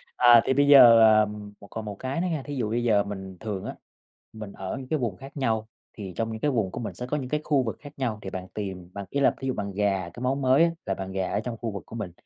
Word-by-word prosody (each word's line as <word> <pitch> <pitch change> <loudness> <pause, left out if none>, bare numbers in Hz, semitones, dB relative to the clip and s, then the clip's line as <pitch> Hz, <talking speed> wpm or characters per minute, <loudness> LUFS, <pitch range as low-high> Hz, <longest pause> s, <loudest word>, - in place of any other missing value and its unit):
À 120 -2 +7
thì 130 - +2
bây 140 +1 +3
giờ, 120 -5 +9
ờ, 110 -1 +6 0.3
một 100 - -13
còn 110 -1 -5
một 105 -1 -5
cái 135 +6 -2
nữa 185 - 0
nha, 150 -5 -2
thí 145 0 -6
dụ 115 -5 -1
bây 120 +1 -1
giờ 105 -4 +3
mình 95 -2 -7
thường 105 -4 -5
á, - - -5 0.6
mình 110 -2 -8
ở 95 +5 -5
những 130 -1 -8
cái 155 0 -1
vùng 110 -7 -2
khác 135 +2 -11
nhau, 110 -4 0 0.3
thì 95 -4 -8
trong 115 0 -1
những 110 - -5
cái 145 - +1
vùng 110 -7 0
của - - -6
mình 115 - -5
sẽ 125 - -6
có 150 - -1
những 130 -3 -5
cái 150 0 -1
khu 140 -4 +2
vực 110 - -4
khác 145 0 -12
nhau 115 -5 -2
thì 95 - -6
bạn 95 0 -6
tìm, 95 -4 -5
bạn 100 0 -6
ý 140 - -1
là 140 - +4
thí 135 - -4
dụ 130 - 0
bạn 100 -1 -4
rà 95 -4 0
cái 120 - -10
món 135 +2 0
mới 130 +5 +4
á, 170 - +3
là 95 - -1
bạn 95 0 -6
rà 95 -1 -2
ở 100 - 0
trong 115 0 -5
khu 115 -1 -4
vực 100 - -7
của 115 - -10
mình, 105 -6 -5
115 Hz, 310 wpm, -26 LUFS, 100-130 Hz, 0.6 s, giờ